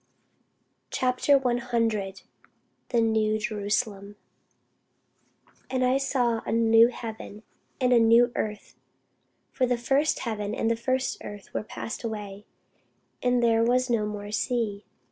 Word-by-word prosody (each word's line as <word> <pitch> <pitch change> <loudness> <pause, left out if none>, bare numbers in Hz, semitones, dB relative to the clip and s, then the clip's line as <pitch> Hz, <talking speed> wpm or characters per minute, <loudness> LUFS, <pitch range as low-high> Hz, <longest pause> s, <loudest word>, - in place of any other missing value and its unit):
CHAPTER 255 +2 +2
100 235 -6 -1 0.7
THE 235 - +2
NEW 220 -1 +2
JERUSALEM 205 -1 -2 1.5
AND 255 -1 +1
I 255 +2 +2
saw 245 -4 0
a - - -4
new 225 0 +5
heaven 225 -3 -8 0.4
and 250 -1 +3
a 240 - +6
new 230 +2 +5
earth: 210 -1 -4 0.8
for 255 - 0
the 245 0 +1
first 270 +6 +1
heaven 215 -2 -3
and 225 -2 0
the - - +2
first 255 +2 -1
earth 205 -1 -10
were - - -1
passed 220 +2 -7
away; 210 -2 -6 0.7
and 245 -1 +2
there 230 -1 +3
was 250 +1 +2
no 215 -3 +1
more 205 0 -6
sea. 215 -3 -2
230 Hz, 125 wpm, -26 LUFS, 215-250 Hz, 1.5 s, a